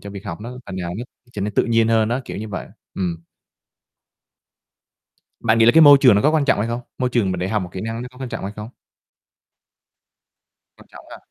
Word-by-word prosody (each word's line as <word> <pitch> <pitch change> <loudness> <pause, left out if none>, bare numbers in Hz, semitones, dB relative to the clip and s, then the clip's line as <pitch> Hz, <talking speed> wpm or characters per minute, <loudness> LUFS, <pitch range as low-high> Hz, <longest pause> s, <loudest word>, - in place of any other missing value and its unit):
cho 100 - -9
việc 100 0 -9
học 85 -3 -6
nó 120 +3 -8
phần 95 - -7
nào 90 -2 -4
nó 120 - -5 0.3
trở 105 - -6
nên 105 +1 -3
tự - - +2
nhiên 115 -1 +2
hơn 110 -1 +2
á, 120 +3 -1
kiểu - - -7
như 110 +2 -6
vậy. 95 -3 -6 0.3
Ừm. 85 -3 -3 2.2
Bạn 115 0 +2
nghĩ 115 - +5
là 120 - +7
cái 165 - +6
môi 145 -2 +9
trường 125 -6 +6
nó 105 - +2
có 150 - +4
quan 155 -2 +1
trọng 140 - +2
hay 110 +3 -1
không? 120 +1 -3 0.2
Môi 125 -1 0
trường 110 -6 +1
mà - - -3
để 90 +1 -3
học 105 -1 -1
một 90 - -6
kỹ 95 - -6
năng 115 +2 -4
nó 125 - -7
có 125 - -17
quan 130 -1 -5
trọng 115 -1 -6
hay 100 - -5
không? 105 +2 -8 2.1
Quan - - -18
trọng - - -14
ha. - - -9
110 Hz, 245 wpm, -20 LUFS, 100-120 Hz, 2.2 s, môi